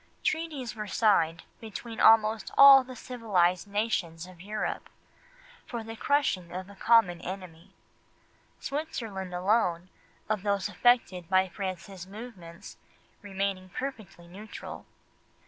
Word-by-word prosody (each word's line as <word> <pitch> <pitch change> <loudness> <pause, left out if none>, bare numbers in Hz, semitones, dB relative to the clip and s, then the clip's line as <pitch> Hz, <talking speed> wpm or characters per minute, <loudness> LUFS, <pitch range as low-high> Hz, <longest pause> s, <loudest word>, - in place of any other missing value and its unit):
Treaties 310 -7 -2
were 210 -1 -5
signed 170 -6 +2 0.2
between 225 +1 -8
almost 220 0 +5
all 275 -1 +10
the 255 0 -10
civilised 205 -8 0
nations 200 -6 -2
of 180 -2 -14
Europe, 210 +3 -4 0.8
for 235 -2 -5
the 225 0 -8
crushing 225 -10 0
of 185 +2 -7
a - - -14
common 195 -5 +3
enemy; 185 -1 -9 0.8
Switzerland 225 - -5
alone, 180 -1 0 0.4
of 215 -2 -1
those 200 0 0
affected 205 -6 +2
by 190 0 +3
France's 185 0 -6
movements, 195 -6 -11 0.4
remaining 195 -2 -3
perfectly 210 -7 -7
neutral. 205 +5 -10
200 Hz, 110 wpm, -28 LUFS, 185-225 Hz, 0.8 s, all